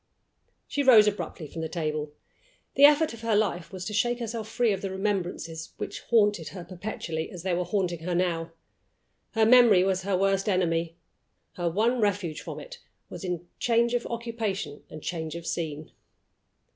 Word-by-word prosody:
She 285 - -1
rose 240 -6 +8
abruptly 205 -5 -3
from 160 +2 -7
the 160 - -3
table. 155 -3 -2 0.6
The 280 - +7
effort 300 -1 +5
of 230 - -10
her 230 -2 +1
life 190 -6 0
was 185 -2 -6
to 210 - -4
shake 240 +3 +1
herself 230 -2 -4
free 230 -1 +2
of 195 - -4
the 195 - -3
remembrances 185 -4 -3
which - - -5
haunted 205 -7 +3
her 180 -3 -7
perpetually 175 -3 -5
as 175 -2 -9
they 185 -1 0
were 180 +1 +1
haunting 180 -2 -1
her 175 +2 -2
now. 170 -2 0 0.8
Her 225 -1 +4
memory 230 -6 +7
was 190 -1 +1
her 190 0 0
worst 195 +1 +1
enemy; 165 -3 0 0.6
her 175 -1 -1
one 225 +7 +1
refuge 190 -6 0
from - - -7
it - - -10 0.3
was - - -7
in 175 -2 -3
change 235 0 +2
of 240 -1 0
occupation 225 -10 -3
and 155 - -10
change 160 -2 -4
of 170 -1 -7
scene. 155 -3 -4
190 Hz, 175 wpm, -27 LUFS, 170-225 Hz, 0.8 s, rose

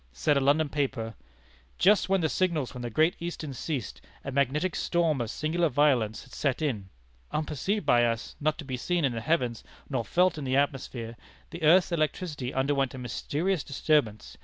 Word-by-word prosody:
Said 145 - +1
a - - +4
London 145 +3 +3
paper: 135 -6 -2 0.6
"Just 200 -1 +4
when 195 -1 +3
the 160 - +2
signals 160 -6 0
from 125 - -8
the 120 - -3
Great 155 +9 +2
Eastern 165 -4 -5
ceased, 130 - -4 0.2
a 135 - -4
magnetic 140 +6 +1
storm 165 -6 +1
of 115 - -3
singular 160 +6 0
violence 125 -6 +2
had - - -18
set 140 -3 0
in. 115 -11 -2 0.4
Unperceived 155 +6 -2
by 120 -4 +5
us, 115 -1 -2
not 150 +1 0
to 160 - -8
be 130 -2 -3
seen 175 +4 0
in 135 - +1
the 115 - -3
heavens, 125 -5 0 0.3
nor - - -1
felt 180 -2 +2
in - - -5
the 130 0 +1
atmosphere, 125 -4 -2 0.4
the 170 - -7
earth's 170 +4 +5
electricity 155 -4 -2
underwent 135 0 0
a - - -7
mysterious 150 - -2
disturbance. 140 -6 0
145 Hz, 185 wpm, -28 LUFS, 125-165 Hz, 0.6 s, by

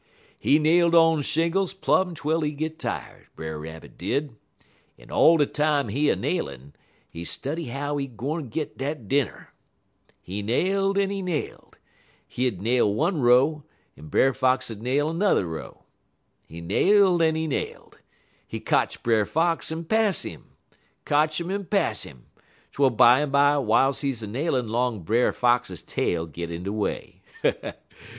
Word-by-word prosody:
"He 145 - +4
nailed 170 +2 +3
on 165 -2 +5
shingles 170 +6 0
plum 190 -2 +1
twel 155 +2 -1
he 150 -1 -1
git 155 +2 -4
tired, - - -6
Brer 80 -1 -6
Rabbit 80 +1 -10
did, 140 -4 -2 0.6
en - - -16
all 165 +1 +5
de 145 - +3
time 145 -4 0
he 140 +8 0
nailin', 70 - -4 0.3
he 85 - -8
study 150 - -4
how 145 +3 -3
he 140 -1 -2
gwine 135 +4 -5
git 150 +6 -5
dat 135 -5 -4
dinner. 140 -1 -1 0.7
He 100 +3 -6
nailed 195 - +1
en 200 0 +1
he 200 -1 -3
nailed. 180 -5 -5 0.5
He 130 +1 -1
'ud 100 -7 -4
nail 120 -2 +2
one 155 - 0
row, 130 +5 +4 0.3
en 75 - -12
Brer 135 - +3
Fox 130 -2 +1
'ud 110 -1 -8
nail 145 +6 0
'n'er 185 - +2
row. 80 -3 -8 0.6
He 85 +1 -10
nailed 185 - +3
en 160 -1 +3
he 160 0 -1
nailed. 150 - -5 0.5
He - - -6
kotch - - 0
Brer 110 -3 +2
Fox 165 0 0
en 160 +1 -4
pass 220 +1 +1
'im - - -8 0.6
kotch 155 +2 +2
'im 170 +2 -4
en 200 +1 -2
pass 175 - 0
'im, 65 -4 -15 0.5
twel 140 -1 +3
bimeby 140 +4 +4
w'iles 130 +4 +2
he 140 - 0 0.2
nailin' 130 +2 -1
'long 115 -3 -1
Brer 115 +8 +2
Fox 120 -8 +1
tail 85 -1 -1
git 85 +1 -7
in 85 +1 -6
he 95 - -3
way. 105 -1 -4
140 Hz, 155 wpm, -25 LUFS, 110-165 Hz, 0.7 s, on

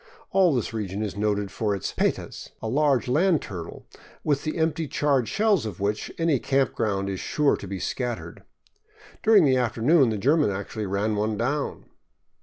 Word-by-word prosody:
All 185 -6 +4
this 120 -2 -2
region 105 -1 -3
is 105 - -4
noted 105 -1 -1
for 105 -1 -1
its 95 - -4
petas, - - -2
a - - -5
large 135 -1 +2
land 165 +6 +3
turtle, 90 -8 -8 0.4
with 145 -2 0
the 155 - -3
empty 160 0 0
charred 140 -5 +1
shells 210 - +2
of 100 -5 -7
which 105 +2 -2
any 165 -5 +2
camping 135 0 +1
ground 100 -2 -1
is 95 -2 -3
sure 150 -2 +1
to 100 - -8
be 95 +1 -4
scattered. 120 +5 -4 0.8
During 215 -6 +6
the 130 -2 +3
afternoon 125 +4 +3
the 110 - -1
German 145 +5 +3
actually 100 +2 -4
ran 100 +3 0
one 105 +1 -1
down. 135 +6 -2
120 Hz, 175 wpm, -25 LUFS, 105-150 Hz, 0.8 s, During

